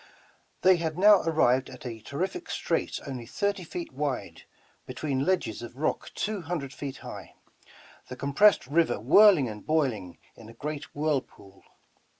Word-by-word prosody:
They 185 Hz, -1 st, +6 dB
had 160 Hz, -1 st, -3 dB
now 205 Hz, +1 st, +7 dB
arrived 130 Hz, -6 st, +2 dB
at 125 Hz, -1 st, -12 dB
a 115 Hz, -2 st, -6 dB
terrific 185 Hz, -, -4 dB
strait -, -, -2 dB
only 130 Hz, -5 st, -6 dB
thirty 200 Hz, -, -1 dB
feet 170 Hz, -2 st, -7 dB
wide, 140 Hz, -1 st, -4 dB, 0.4 s
between 135 Hz, +1 st, -2 dB
ledges 175 Hz, -, 0 dB
of 120 Hz, +1 st, -9 dB
rock 155 Hz, -, -1 dB
two 210 Hz, -2 st, -2 dB
hundred 160 Hz, -5 st, -4 dB
feet 135 Hz, +1 st, -6 dB
high, -, -, -9 dB, 0.7 s
the 125 Hz, -, -7 dB
compressed 140 Hz, +11 st, +4 dB
river 160 Hz, -2 st, +1 dB
whirling 150 Hz, -, +6 dB
and 105 Hz, -2 st, -8 dB
boiling 130 Hz, -, -1 dB, 0.2 s
in 110 Hz, -1 st, -13 dB
a 115 Hz, -, -13 dB
great 150 Hz, +3 st, -6 dB
whirlpool. 140 Hz, -10 st, -3 dB
145 Hz, 150 wpm, -27 LUFS, 125-170 Hz, 0.7 s, now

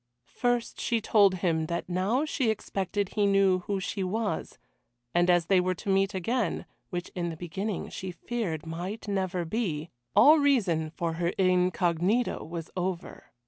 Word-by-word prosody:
First 245 Hz, -, -1 dB
she 235 Hz, -, +1 dB
told 205 Hz, -3 st, +4 dB
him 165 Hz, -3 st, 0 dB
that 170 Hz, +1 st, -3 dB
now 195 Hz, -, +1 dB
she 265 Hz, -6 st, 0 dB
expected 200 Hz, -2 st, -2 dB
he 205 Hz, -2 st, +1 dB
knew 195 Hz, -2 st, +4 dB
who 195 Hz, +2 st, -2 dB
she 190 Hz, +1 st, -3 dB
was, 205 Hz, -1 st, -2 dB, 0.6 s
and 175 Hz, +1 st, +3 dB
as 175 Hz, -2 st, +4 dB
they 190 Hz, +1 st, +4 dB
were 185 Hz, 0 st, 0 dB
to 195 Hz, -, -6 dB
meet 195 Hz, 0 st, +2 dB
again 220 Hz, +2 st, -1 dB, 0.2 s
which 175 Hz, 0 st, -4 dB
in 175 Hz, -1 st, -2 dB
the 165 Hz, -, -6 dB
beginning 190 Hz, +5 st, -4 dB
she 190 Hz, -, -6 dB
feared 175 Hz, -4 st, -4 dB
might 180 Hz, +7 st, -5 dB
never 185 Hz, -3 st, -1 dB
be 165 Hz, -5 st, -2 dB, 0.2 s
all 305 Hz, +2 st, +8 dB
reason 200 Hz, -, +2 dB
for 165 Hz, +1 st, -3 dB
her 170 Hz, -, +2 dB
incognito 185 Hz, +3 st, +2 dB
was 165 Hz, 0 st, -7 dB
over. 180 Hz, -1 st, -4 dB
185 Hz, 160 wpm, -28 LUFS, 175-210 Hz, 0.6 s, all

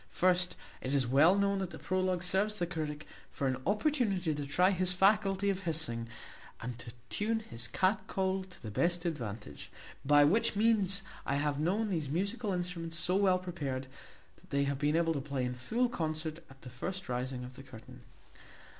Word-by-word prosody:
First, 180 Hz, 0 st, +2 dB, 0.2 s
it 130 Hz, +2 st, -1 dB
is 135 Hz, -2 st, +3 dB
well 145 Hz, +9 st, +5 dB
known 200 Hz, 0 st, +2 dB
that 190 Hz, -2 st, -2 dB
the 160 Hz, -, -9 dB
prologue 185 Hz, +3 st, 0 dB
serves 195 Hz, +4 st, +2 dB
the 175 Hz, -4 st, -1 dB
critic 155 Hz, -3 st, -4 dB, 0.3 s
for 140 Hz, -, -3 dB
an 130 Hz, -1 st, 0 dB
opportunity 205 Hz, -, +1 dB
to 145 Hz, -1 st, -4 dB
try 180 Hz, +7 st, +4 dB
his 185 Hz, -1 st, +1 dB
faculty 195 Hz, +1 st, +3 dB
of 190 Hz, -, -3 dB
hissing, 155 Hz, -10 st, +1 dB, 0.5 s
and 120 Hz, +1 st, -5 dB
to 120 Hz, -1 st, -8 dB, 0.2 s
tune 220 Hz, +2 st, 0 dB
his 115 Hz, -, -3 dB
cat 185 Hz, -, +1 dB
call 190 Hz, -1 st, 0 dB
to 185 Hz, -, -16 dB
the 110 Hz, -, -5 dB
best 170 Hz, -, +1 dB
advantage; 115 Hz, -10 st, -4 dB, 0.3 s
by 145 Hz, +1 st, +6 dB
which 200 Hz, +9 st, +3 dB
means, 200 Hz, -3 st, +3 dB, 0.2 s
I 140 Hz, -, -1 dB
have 145 Hz, 0 st, 0 dB
known 200 Hz, +7 st, 0 dB
those 160 Hz, -6 st, -1 dB
musical 200 Hz, -, -1 dB
instruments 175 Hz, -2 st, -3 dB
so 180 Hz, +2 st, +1 dB
well 190 Hz, -2 st, +4 dB
prepared, 145 Hz, -8 st, -4 dB, 0.5 s
that -, -, -22 dB
they 140 Hz, 0 st, +1 dB
have 140 Hz, -1 st, -1 dB
been 150 Hz, +1 st, +2 dB
able 165 Hz, 0 st, +2 dB
to 140 Hz, -, -2 dB
play 135 Hz, -2 st, -2 dB
in 125 Hz, -, -2 dB
full 225 Hz, -, 0 dB
concert 155 Hz, -5 st, -3 dB
at 135 Hz, 0 st, -17 dB
the 125 Hz, -, -9 dB
first 185 Hz, +9 st, -5 dB
rising 125 Hz, +1 st, -3 dB
of 125 Hz, +1 st, -9 dB
the 135 Hz, -, -10 dB
curtain. 125 Hz, -5 st, -13 dB
170 Hz, 190 wpm, -32 LUFS, 140-190 Hz, 0.5 s, by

